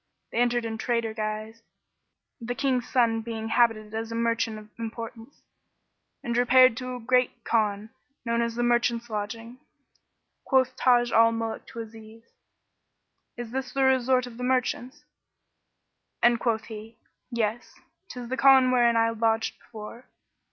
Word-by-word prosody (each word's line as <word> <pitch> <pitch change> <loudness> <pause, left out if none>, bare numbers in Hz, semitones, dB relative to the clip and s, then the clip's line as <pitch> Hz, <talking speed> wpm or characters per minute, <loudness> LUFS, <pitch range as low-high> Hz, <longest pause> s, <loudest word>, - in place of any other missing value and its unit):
They - - -2
entered 240 -1 +1
in 220 -1 -4
trader 230 -2 -1
guise, 215 +1 -5 0.8
the 240 0 -4
King's 260 -2 0
son 230 -3 +2
being 225 -1 -5
habited 225 -2 +2
as 225 +1 -4
a - - -4
merchant 230 -1 0
of 215 0 -12
importance; 230 +2 -8 0.8
and 235 - -2
repaired 250 0 +5
to 255 0 -5
a - - -7
great 250 0 +1
Khan, 215 -1 0 0.3
known 235 0 0
as 235 -1 -2
the 240 - -1
Merchants' 240 -1 +1
Lodging. 225 +4 -5 0.8
Quoth 260 -1 +2
Taj 240 -1 +3
al 230 0 +5
Muluk 225 -1 -4
to 230 - -7
Aziz, 225 0 -12 1.1
"Is 240 -2 -6
this 260 0 -4
the 275 - +1
resort 260 -1 +3
of 240 -2 -11
the 250 - -6
merchants?"; 255 +1 -1 1.2
and 240 -1 +5
quoth 225 -2 0
he, 220 +1 -10 0.3
"Yes; 235 -1 -3 0.3
'tis 245 -1 -7
the 260 - -2
Khan 265 -2 +6
wherein 240 -2 +4
I 230 0 +3
lodged 225 0 0
before." 225 +2 -11
235 Hz, 145 wpm, -26 LUFS, 225-250 Hz, 1.2 s, Khan